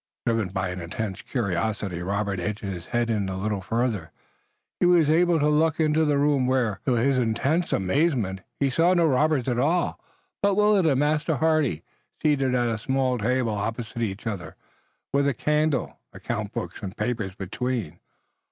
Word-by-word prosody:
Driven 115 -4 +1
by 95 0 -2
an 90 0 -5
intense 95 +3 -4
curiosity, 100 -4 -2
Robert 100 +1 -1
edged 105 +4 -3
his 95 -4 -5
head 120 -1 0
a 110 - +1
little 95 +1 -2
farther 115 +5 0
forward, 90 -7 -6 0.7
and 175 - +4
was 165 -4 +5
able 170 0 +3
to 150 - +2
look 155 +1 +2
into 155 0 +3
the 145 -2 +2
room, 140 -2 +2
where, 125 -6 +1
to 130 - +3
his 130 +3 +2
intense 135 +9 0
amazement, 95 - +1 0.2
he 140 -1 +1
saw 170 +6 +3
no 170 -1 +4
robbers 150 -2 +2
at 120 -2 0
all, 165 +6 +1 0.4
but 200 -1 +3
Willet 210 -3 +4
and 135 -4 +3
Master 150 +2 +1
Hardy 150 - +1 0.4
seated 135 -4 +2
at 120 -1 +2
a 115 -2 -1
small 130 +1 0
table 120 +1 0
opposite 115 +3 -4
each 105 0 -3
other, 95 -8 -5 0.6
with 140 0 +3
a 140 - +1
candle, 150 -1 0
account - - -4
books - - -5
and 95 +2 -6
papers 110 -6 -2
between. 100 -3 -3
125 Hz, 170 wpm, -25 LUFS, 100-150 Hz, 0.7 s, was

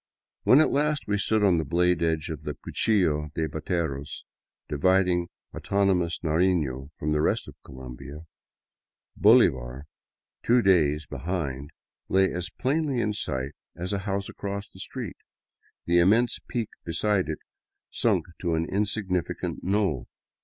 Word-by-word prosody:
When 130 - +7
at - - +3
last 150 +1 +1
we 105 0 0
stood 110 +1 +1
on 90 -4 +4
the - - 0
blade 85 +3 +2
edge 80 0 0
of 75 -2 -6
the 75 -1 -5
Cuchillo 80 -9 +1
de 80 -1 0
Bateros, 80 -2 -3 0.4
dividing 90 +3 +2 0.3
autonomous 95 -4 +1
Narifio 80 -5 +1
from 75 - -2
the 75 0 +2
rest - - +1
of - - -9
Colombia, 65 +3 -9 0.9
Bolivar, 70 - +4 0.6
two 120 0 +3
days 75 -6 +3
be 70 - -7
hind, 70 -4 -3 0.4
lay 95 0 +3
as 90 0 -3
plainly 140 +4 0
in 105 -2 0
sight 65 -9 -3 0.2
as 90 +3 -4
a 100 - 0
house 100 0 -2
across 100 +1 -5
the 95 - -15
street, 115 +1 -6 0.7
the 85 +1 +4
immense 110 +8 +3
peak 115 -3 -2
beside 95 0 0
it 80 - -2 0.5
sunk - - +1
to 85 -3 0
an 80 +1 0
insignificant 95 -2 -2
knoll. 95 - 0
90 Hz, 140 wpm, -26 LUFS, 75-100 Hz, 0.9 s, When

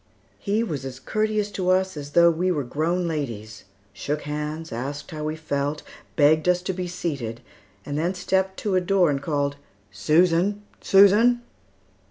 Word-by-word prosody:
He 210 +2 0
was 150 - -4
as 130 -1 -7
courteous 215 +1 -1
to 185 -2 -2
us 185 0 +2
as 145 -1 -8
though 170 0 +6
we 175 +3 0
were 150 -5 -1
grown 165 +7 -1
ladies, 115 -9 -5 0.3
shook 145 +9 -3
hands, 150 +2 -4
asked 140 +5 -5
how 155 -1 -5
we 155 +1 -2
felt, 145 -1 -3 0.3
begged 155 +3 +4
us 180 0 +2
to 190 - -2
be 180 0 -4
seated, 140 -10 -4 0.5
and 145 +1 -3
then 175 +4 -1
stepped 190 +1 0
to 205 - -1
a 185 - +3
door 180 -3 +3
and 140 -1 -2
called, 145 -1 -1 0.3
"Susan! 170 - +2 0.2
Susan!" 210 +5 +5
160 Hz, 165 wpm, -24 LUFS, 145-185 Hz, 0.5 s, though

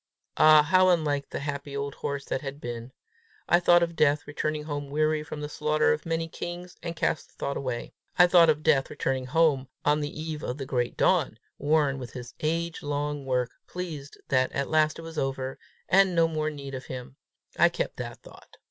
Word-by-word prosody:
Ah, 155 -1 +7
how 185 +4 +4
unlike 150 -5 +1
the - - -4
happy 140 -1 -4
old 140 0 -3
horse 140 -1 -4
that - - -2
had 140 0 -6
been! 120 -1 -6 0.6
I 175 - +5
thought 175 0 +5
of 170 0 -2
Death 145 -1 +3
returning 150 +1 -2
home 145 -2 -4
weary 155 +1 +1
from 150 0 -7
the 150 - -3
slaughter 150 - +2
of 75 - -5
many 165 0 -1
kings, 175 +2 -7
and 170 0 -5
cast 155 - -1
the - - -28
thought 140 - -3
away. 125 -3 -4 0.2
I 180 - +8
thought 175 -2 +6
of 155 0 +1
Death 145 -4 +3
returning 130 -1 -2
home 140 -2 +2 0.2
on 150 +1 +3
the 145 -1 -2
eve 155 -1 -4
of 125 - -4
the 135 - -5
great 125 -2 -1
dawn, 160 -11 +2 0.2
worn 145 -2 +2
with 125 -2 -8
his 125 -1 -8
age 165 +1 -1
long 145 -1 -3
work, 125 -2 0 0.2
pleased 160 -6 -6
that 130 -1 +2
at 140 0 -2
last 155 -1 +3
it 165 - -8
was 165 -1 -5
over, 135 -1 -3 0.3
and 190 -1 +4
no 165 -1 +4
more 155 -1 -1
need 140 -2 -8
of 130 0 -6
him: 130 +1 -8 0.4
I - - +7
kept - - -3
that - - -7
thought. - - -16
150 Hz, 205 wpm, -27 LUFS, 135-160 Hz, 0.6 s, I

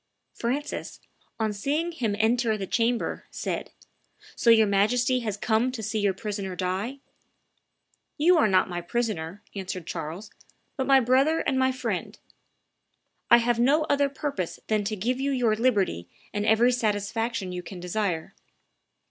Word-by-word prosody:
Francis, 285 +5 -3 0.4
on 220 -1 0
seeing 295 +11 -1
him 230 -11 -1
enter 225 0 +2
the 195 - -4
chamber, 230 +4 0
said, - - -4 0.7
"So 235 - +2
your 225 -1 +7
Majesty 240 +6 +2
has 215 -4 -3
come 225 +4 +1
to 225 -4 -5
see 215 +1 -1
your 200 -2 +1
prisoner 200 -2 -4
die?" 190 +8 -2 1.2
"You 340 +4 +5
are 255 - +5
not 190 -2 +3
my 175 -1 -4
prisoner," 200 -3 -3
answered 185 -3 -5
Charles, 165 +6 -6 0.4
"but 265 -2 -2
my 270 -1 +7
brother 265 +6 +3
and 265 -1 0
my 260 0 +3
friend: 255 - -4 1.1
I 235 - +9
have 235 0 +1
no 285 +6 +4
other 285 0 +3
purpose 275 - -4
than 215 -1 +2
to 215 +1 -1
give 240 +6 -1
you 275 +1 0
your 245 -5 +2
liberty 205 - +1 0.2
and 205 +1 -1
every 230 +3 +5
satisfaction 225 -2 -1
you 180 0 -4
can 180 +1 -9
desire." 180 -2 -2
220 Hz, 150 wpm, -26 LUFS, 200-255 Hz, 1.2 s, I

